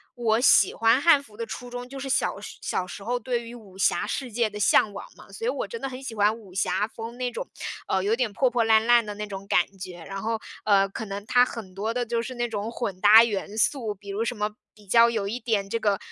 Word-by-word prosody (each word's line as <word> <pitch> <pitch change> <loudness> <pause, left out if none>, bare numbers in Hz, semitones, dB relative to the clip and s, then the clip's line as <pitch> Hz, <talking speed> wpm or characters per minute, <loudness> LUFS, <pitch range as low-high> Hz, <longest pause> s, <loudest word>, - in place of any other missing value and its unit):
我 230 -2 +1
喜 260 - +5
欢 230 +2 +3
汉 320 -3 +6
服 215 -7 -18
的 230 - -3
初 245 +2 -7
衷， 245 0 -6
就 270 +1 -8
是 270 0 -5
小 - - 0
时 - - -9
小 180 - -2
时 195 - -9
候 245 +3 -1
对 240 0 -2
于 235 +1 -9
武 200 -5 -14
侠 195 - +2
世 255 +2 -4
界 230 0 +1
的 210 0 -8
向 210 +1 +4
往 - - -7
嘛， - - -16
所 455 - -6
以 - - +2
我 - - -2
真 465 - -6
的 - - -3
很 260 0 -7
喜 245 - -5
欢 210 +1 +3
武 200 -5 -15
侠 190 +2 0
风 230 +1 -8
那 250 -1 -2
种， - - -5 0.4
呃， 190 0 0
有 210 +3 +2
点 245 -3 -1
破 260 +5 +2
破 240 -1 +1
烂 220 0 +4
烂 240 -1 +5
的 210 - -5
那 210 +1 -4
种 195 -1 -7
感 180 - +3
觉。 180 -2 -8
然 195 0 -5
后， 225 0 -1 0.3
呃， 195 -2 +4
可 220 +3 -6
能 200 0 -6
它 245 +1 +5
很 220 -7 -8
多 215 +4 -2
的 245 0 -1
就 235 0 -1
是 255 +2 -6
那 240 0 -1
种 210 0 -3
混 205 -6 -4
搭 210 +3 +8
元 210 -2 -3
素， 225 -2 +1
比 200 +1 -13
如 200 +3 -1
什 245 - -2
么 210 -1 -1 0.3
比 210 -1 -19
较 230 +4 +6
有 215 -4 -2
一 230 +5 -3
点 215 -5 -1
这 230 - -1
个 205 -3 +1
225 Hz, 290 characters per minute, -25 LUFS, 205-245 Hz, 0.4 s, 搭